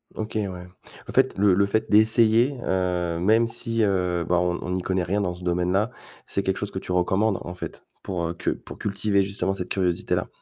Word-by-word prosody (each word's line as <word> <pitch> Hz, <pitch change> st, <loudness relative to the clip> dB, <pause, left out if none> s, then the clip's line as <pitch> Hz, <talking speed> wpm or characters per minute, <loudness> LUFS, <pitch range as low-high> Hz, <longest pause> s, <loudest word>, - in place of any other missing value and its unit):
OK, 110 Hz, 0 st, -5 dB
ouais. 95 Hz, -4 st, -3 dB, 0.4 s
En -, -, -6 dB
fait, -, -, +3 dB
le 100 Hz, -1 st, +4 dB
le 100 Hz, +2 st, +3 dB
fait 110 Hz, +2 st, -1 dB
d'essayer, 110 Hz, +4 st, +4 dB
heu, 90 Hz, -2 st, 0 dB
même 110 Hz, +6 st, +3 dB
si, 115 Hz, 0 st, -1 dB
heu, 90 Hz, -4 st, +1 dB
bah, 90 Hz, -, +2 dB
on 90 Hz, 0 st, 0 dB
on -, -, -5 dB
n'y 90 Hz, 0 st, -1 dB
connaît 95 Hz, 0 st, 0 dB
rien 100 Hz, +4 st, 0 dB
dans 90 Hz, -2 st, -1 dB
ce 90 Hz, +1 st, -12 dB
domaine-là, 90 Hz, +5 st, +1 dB, 0.4 s
c'est 100 Hz, -, -1 dB
quelque 95 Hz, 0 st, 0 dB
chose 105 Hz, -, -4 dB
que 95 Hz, -, -4 dB
tu 90 Hz, -, -7 dB
recommandes, 95 Hz, +3 st, +1 dB
en 90 Hz, -, -6 dB
fait, 90 Hz, -, -8 dB, 0.2 s
pour, 90 Hz, -3 st, -2 dB
heu, 85 Hz, -, -3 dB
que -, -, -2 dB
pour -, -, -6 dB
cultiver, 100 Hz, -1 st, +1 dB
justement, 95 Hz, 0 st, -2 dB
cette 90 Hz, -2 st, -5 dB
curiosité-là? 90 Hz, -3 st, 0 dB
95 Hz, 215 wpm, -24 LUFS, 90-105 Hz, 0.4 s, le